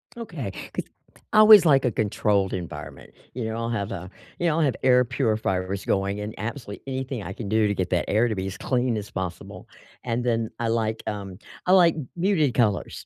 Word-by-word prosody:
Okay, 165 Hz, -, -6 dB, 0.2 s
'cause -, -, -3 dB, 0.5 s
I 215 Hz, -, +6 dB
always 215 Hz, -4 st, +9 dB
like 135 Hz, -3 st, +5 dB
a 120 Hz, -, +2 dB
controlled 100 Hz, -2 st, 0 dB
environment, 90 Hz, -3 st, -7 dB, 0.2 s
you 125 Hz, -1 st, -4 dB
know, 110 Hz, +1 st, -3 dB
I'll 115 Hz, 0 st, -2 dB
have 110 Hz, -2 st, -2 dB
a 90 Hz, -1 st, -6 dB, 0.3 s
you 175 Hz, -, +1 dB
know, 155 Hz, -, +2 dB
I'll -, -, +2 dB
have 135 Hz, -, +1 dB
air 125 Hz, -1 st, +5 dB
purifiers 110 Hz, -6 st, -1 dB
going 100 Hz, +1 st, 0 dB
and 105 Hz, +1 st, -5 dB
absolutely 110 Hz, 0 st, -6 dB
anything 130 Hz, -4 st, -4 dB
I 95 Hz, +2 st, -6 dB
can 100 Hz, -2 st, -6 dB
do 110 Hz, -1 st, +3 dB
to 100 Hz, -, -1 dB
get 90 Hz, -1 st, -2 dB
that 90 Hz, -, +1 dB
air 110 Hz, +4 st, +3 dB
to 110 Hz, -, -2 dB
be 95 Hz, 0 st, -3 dB
as 95 Hz, 0 st, -6 dB
clean 125 Hz, -2 st, 0 dB
as 105 Hz, -, -6 dB
possible, 90 Hz, -2 st, -6 dB, 0.4 s
and 120 Hz, 0 st, -2 dB
then 115 Hz, -2 st, 0 dB
I 115 Hz, -1 st, 0 dB
like, 110 Hz, -1 st, -1 dB
um, 100 Hz, -3 st, -5 dB, 0.3 s
I 180 Hz, -, +4 dB
like 170 Hz, -4 st, +6 dB, 0.2 s
muted 170 Hz, -, +2 dB
colors. 105 Hz, -6 st, 0 dB
110 Hz, 205 wpm, -25 LUFS, 100-130 Hz, 0.5 s, always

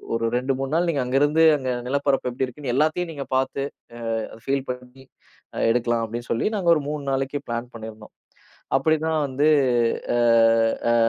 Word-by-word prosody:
ஒரு 115 Hz, 0 st, -1 dB
2 130 Hz, +2 st, 0 dB
3 135 Hz, +2 st, -3 dB
நாள் 175 Hz, +1 st, +2 dB
நீங்க 145 Hz, -5 st, 0 dB
அங்க 125 Hz, +2 st, -2 dB
இருந்து, 155 Hz, +3 st, +3 dB
அந்த 130 Hz, -2 st, -4 dB, 0.2 s
நிலப்பரப்பு 140 Hz, -1 st, 0 dB
எப்படி 130 Hz, +2 st, -1 dB
இருக்குன்னு 125 Hz, 0 st, -5 dB
எல்லாத்தையும் 155 Hz, +4 st, +1 dB
நீங்கப் 140 Hz, -2 st, -6 dB
பார்த்து 135 Hz, +1 st, -1 dB, 0.6 s
அ, -, -, -3 dB, 0.2 s
ஃபீல் 135 Hz, 0 st, -1 dB
பண்ணி 125 Hz, +1 st, -11 dB, 0.7 s
எடுக்கலாம் 120 Hz, -1 st, +1 dB
அப்டின்னு 120 Hz, +2 st, -7 dB
சொல்லி 115 Hz, -, 0 dB
நாங்க 180 Hz, -4 st, 0 dB
ஒரு 150 Hz, -, 0 dB
3 150 Hz, -1 st, -4 dB
நாளைக்கு 135 Hz, +2 st, -1 dB
பிளான் 120 Hz, +1 st, -4 dB
பண்ணியிருந்தோம். 110 Hz, -1 st, -10 dB, 0.6 s
அப்டின்னு 155 Hz, +3 st, +1 dB
தான் 155 Hz, -2 st, +1 dB
வந்து 140 Hz, +3 st, +1 dB, 0.7 s
அ, -, -, +2 dB, 0.7 s
அ, -, -, +3 dB
135 Hz, 170 wpm, -23 LUFS, 125-150 Hz, 0.7 s, இருந்து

